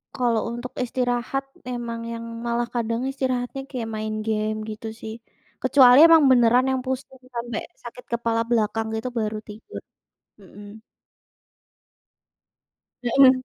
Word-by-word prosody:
kalau 240 -3 +1
untuk 240 +1 -6
istirahat 245 +2 -1 0.3
emang 235 -2 -4
yang 230 0 -5 0.2
malah 235 0 0
kadang 230 0 -1
istirahatnya 260 0 -2
kayak 235 -4 -4
main 215 0 -3
game 215 0 0
gitu 220 +1 -6
sih, 220 - -6 0.5
kecuali 260 -1 +7
emang 325 -2 +7
beneran 245 +1 +5
yang 260 - 0
pusing 260 0 -4 0.2
sampai 235 -1 -3 0.2
sakit 245 +1 -10
kepala 230 -1 0
belakang 225 -1 +1
gitu 220 +3 -3
baru 215 0 -2
tidur. 220 - -9 0.6
Mmm. 205 +2 -13 2.4
Heeh. 260 +2 +6
240 Hz, 120 wpm, -24 LUFS, 225-255 Hz, 2.4 s, kecuali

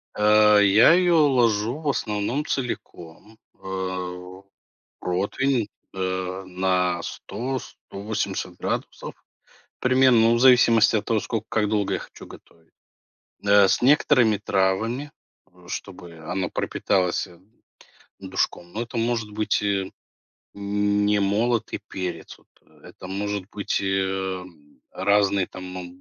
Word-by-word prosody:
Э, 105 0 +5
я 100 +8 +6
её 170 -4 +4
ложу 120 -1 +1
в 155 -2 -2
основном 115 +3 -2
целиком, 110 -5 -6 0.2
э, 95 -1 -5 0.6
протвень, 110 +7 -1 0.3
э, 95 0 -3
на 90 -1 0
100-180 110 -2 -5
градусов - - -4 0.7
примерно. 130 -1 +4
Ну, 115 +1 +4
в - - 0
зависимости 120 -3 +5
от 105 -1 -1
того, 115 -2 +1
сколько 110 0 -4
как 105 -2 +1
долго 105 -2 0
я - - -3
хочу - - -12
готовить. 80 -1 -17 0.7
Э, 100 -1 +6
с - - +1
некоторыми 125 -4 +4
травами, 110 +8 -1 0.4
э, 90 -1 -19
чтобы 90 -3 -8
она 90 +3 -3
пропиталась, 90 -3 -1
э, 85 -1 -17 0.8
душком, 85 0 -3
но 115 - -3
это 120 0 -8
может 115 -2 -1
быть, 105 0 0
э, 100 -2 -1 0.6
н 105 0 0
не 105 0 +2
молотый 110 +4 0
перец 90 -3 -6
вот, - - -27 0.2
э. - - -21
Это - - -11
может 100 0 -3
быть, 100 - -2
э, 95 -1 -1 0.5
разные 100 -1 +2
там, 95 - -10
моб 90 -1 -7
100 Hz, 120 wpm, -24 LUFS, 95-115 Hz, 0.8 s, я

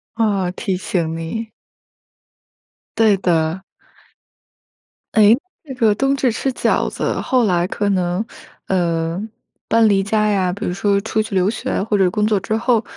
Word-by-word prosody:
哦， 205 -5 +1
提 190 - -2
醒 170 -3 -2
你。 220 +8 -5 1.5
对 220 -3 +4
的。 170 0 0 1.5
哎， 215 +1 +6 0.3
这 270 - -7
个 225 -4 +3
冬 270 +3 +1
至 260 -3 +1
吃 265 +4 -2
饺 - - +1
子 - - -2
后 255 -2 +1
来 180 -4 +1
可 205 0 -1
能， 185 +1 0 0.4
呃， 170 -1 0 0.5
搬 230 -1 +4
离 195 -1 +3
家 210 +2 +1
呀 185 -3 +1
比 205 - -5
如 - - -1
说 200 +1 +1
出 220 +1 -1
去 215 -2 -5
留 185 +2 +3
学 215 - -2
或 210 0 0
者 190 -2 +3
工 210 +3 0
作 210 -2 +2
之 215 +3 -2
后， 235 -1 +1
200 Hz, 165 characters per minute, -19 LUFS, 180-220 Hz, 1.5 s, 哎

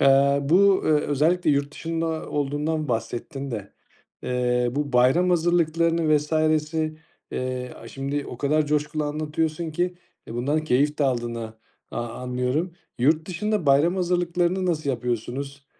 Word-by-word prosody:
eee, 140 +1 +5
bu, 190 +6 +4
eee, - - +2
özellikle 155 +4 +2
yurt 140 0 +1
dışında 165 0 -3
olduğundan 150 +2 -1
bahsettin 120 +4 -3
de, 105 -4 -6 0.5
eee, 125 -1 +1
bu 145 -1 -2
bayram 130 +9 +4
hazırlıklarını 165 -2 +2
vs.si, 155 +1 0 0.3
eee, 125 0 -3
aaa, 115 - -11
şimdi 140 +3 -3
o 120 - -8
kadar 150 +2 +2
coşkulu 150 +1 0
anlatıyorsun 155 +2 -2
ki, 175 +3 -1 0.3
e, 115 - -7
bundan 145 +6 0
keyif 145 +2 +2
de 145 - +2
aldığını 120 -3 -2 0.4
a - - -3
anlıyorum. 125 +8 -2 0.3
Yurtdışında 170 - +1
bayram 150 +7 +4
hazırlıklarını 180 +1 +1
nasıl 155 -5 0
yapıyorsunuz? 130 +3 -4
150 Hz, 130 wpm, -24 LUFS, 135-165 Hz, 0.5 s, eee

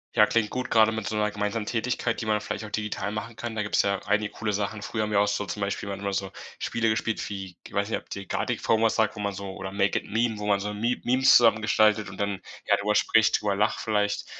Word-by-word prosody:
Ja, 105 - +7
klingt 105 0 +1
gut, 125 0 -4
grade 110 -1 +5
mit 110 -2 -4
so 110 - -2
'ner 105 0 +1
gemeinsamen 105 +1 -2
Tätigkeit, 120 +1 -1
die - - -4
man 105 -1 +1
vielleicht 105 - -5
auch 105 - -8
digital 105 -1 -3
machen 110 +2 -5
kann. 115 0 -5
Da 110 - -1
gibt's 105 - +2
ja 100 -1 0
einige 105 +1 +1
coole 105 -2 -3
Sachen. 105 +1 -2
Früher 110 0 -2
haben 105 - -3
wir 100 - +3
auch 105 - +3
so 105 0 -1
zum 105 - -5
Beispiel 100 0 -2
dann 100 -1 -4
immer 100 0 -3
so 95 0 -2 0.3
Spiele 115 -1 0
gespielt 110 0 -1
wie 95 -3 -7
g - - -13
weiß 100 +1 0
nicht, - - 0
ob - - -24
dir 100 0 -6
„Gartic - - -2
Phone“ 110 0 +2
was 115 - +3
sagt, 110 -1 +1
wo - - -6
man 100 -1 -2
so 100 0 -6
oder 95 -1 -6
„Make 100 0 +2
it - - -15
Meme“, 110 0 0
wo 105 - -4
man 100 -1 +3
so 105 +1 -3
Me 115 +4 0
Memes 130 +2 +5
zusammen 115 -2 +6
gestaltet 105 0 +3
und 95 - -10
dann, 100 -1 -2 0.2
ja, - - +3
drüber 105 +1 0
spricht, 110 0 +3
drüber 100 -2 0
lacht 105 +2 +1
vielleicht, 105 -2 0
105 Hz, 275 wpm, -26 LUFS, 100-110 Hz, 0.3 s, Ja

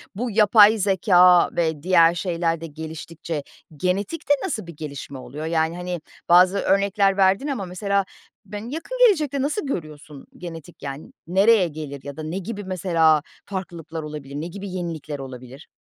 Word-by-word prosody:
Bu 235 +4 -3
yapay 210 +1 +6
zekâ 180 -3 +5
ve 160 -3 -1
diğer 170 -2 +5
şeyler 170 -2 -1
de 165 - -5
geliştikçe 160 0 -6 0.3
genetikte 200 - 0
nasıl 220 - -4
bir 170 - -9
gelişme 140 -2 -7
oluyor? 130 +5 -7
Yani, 160 0 0
hani, 180 -1 -4 0.3
bazı 180 +3 +6
örnekler 200 0 +2
verdin 195 +8 +3
ama 255 -9 -3
mesela 200 +2 -1 0.4
ben 210 +3 -7
yakın 330 - -5
gelecekte 300 - +1
nasıl 295 +7 -1
görüyorsun 150 - -7
genetik 165 -2 -10
yan 140 +1 -7
nereye 195 +2 +4
gelir 150 -3 -7
ya 140 -1 -8
da 155 - -5
ne 160 +4 -4
gibi 205 +2 -5
mesela 165 -5 +2 0.2
farklılıklar 170 -4 -6
olabilir? 150 -2 -8
Ne 155 +3 -4
gibi 200 +3 -7
yenilikler 165 -5 -5
olabilir? 130 +1 -10
175 Hz, 150 wpm, -23 LUFS, 155-200 Hz, 0.4 s, yapay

